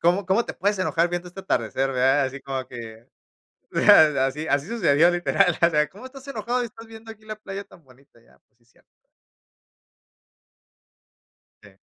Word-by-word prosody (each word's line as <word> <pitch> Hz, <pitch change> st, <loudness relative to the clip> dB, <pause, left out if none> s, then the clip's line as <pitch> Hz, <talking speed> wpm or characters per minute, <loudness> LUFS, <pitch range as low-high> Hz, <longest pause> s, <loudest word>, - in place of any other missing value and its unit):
"¿Cómo 180 Hz, +3 st, +1 dB
cómo 200 Hz, +5 st, +2 dB
te -, -, -7 dB
puedes 205 Hz, 0 st, -1 dB
enojar 170 Hz, -2 st, +1 dB
viendo 175 Hz, 0 st, -4 dB
este 195 Hz, +2 st, -10 dB
atardecer, 130 Hz, -, -1 dB
verdad?", 130 Hz, +3 st, +3 dB
así 135 Hz, +1 st, -8 dB
como 135 Hz, -1 st, -5 dB
que 115 Hz, -2 st, -10 dB, 1.1 s
así, 135 Hz, +4 st, -1 dB
así 140 Hz, +3 st, 0 dB
sucedió, 175 Hz, -8 st, +3 dB
literal, 175 Hz, -1 st, +1 dB
o 170 Hz, -, +5 dB
sea, 150 Hz, -2 st, +1 dB
"¿Cómo 205 Hz, +7 st, -13 dB
estás 270 Hz, +1 st, -12 dB
enojado 245 Hz, -1 st, -2 dB
y 245 Hz, -, -2 dB
estás 225 Hz, 0 st, -12 dB
viendo 225 Hz, 0 st, -11 dB
aquí 215 Hz, 0 st, -17 dB
la 215 Hz, 0 st, -6 dB
playa 200 Hz, -1 st, -7 dB
tan 170 Hz, -, -20 dB
bonita?", 130 Hz, -2 st, -23 dB
ya, -, -, -26 dB
pues -, -, -46 dB
sí 120 Hz, -, -35 dB
es 120 Hz, -, -34 dB
cierto. -, -, -29 dB, 2.8 s
Sí. -, -, -18 dB
175 Hz, 175 wpm, -23 LUFS, 135-210 Hz, 2.8 s, o